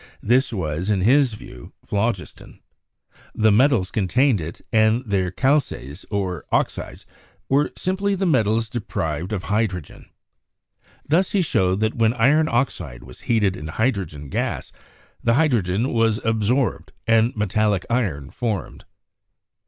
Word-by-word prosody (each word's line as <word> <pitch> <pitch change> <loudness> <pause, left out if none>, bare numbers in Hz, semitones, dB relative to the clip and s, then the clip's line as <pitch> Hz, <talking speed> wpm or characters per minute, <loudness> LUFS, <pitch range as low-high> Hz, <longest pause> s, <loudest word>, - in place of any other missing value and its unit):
This 125 +5 +3
was, 90 -2 -3
in 100 -3 +1
his 125 +2 +4
view, 60 - -12
phlogiston. 100 -2 -3 0.8
The 110 0 +4
metals 115 -4 +3
con 100 -4 -1
tained 125 -1 +3
it, 80 +3 -7
and 110 +2 +3
their 95 -4 0
"calces," 100 - -1
or 95 -6 -2
oxides, - - -2 0.4
were 140 +2 +2
simply 195 +2 0
the 195 0 -1
metals 115 - +2
deprived 90 -7 -3
of 100 -4 -3
hydrogen. 100 -6 -3 1.0
Thus, 175 +6 +2
he 195 -3 +3
showed 95 - +1
that 110 0 +1
when 115 0 +2
iron 145 +7 +3
oxide 90 - -2
was 65 0 -13
heated 105 -5 +1
in 75 -4 -7
hydrogen 90 - -2
gas - - -3 0.5
the 115 0 +3
hydrogen 120 - +1
was 115 -2 +2
absorbed 115 +3 0
and 115 +2 +3
metallic 105 -2 0
iron 90 - -1
formed. 110 -5 -4
110 Hz, 130 wpm, -22 LUFS, 95-125 Hz, 1.0 s, his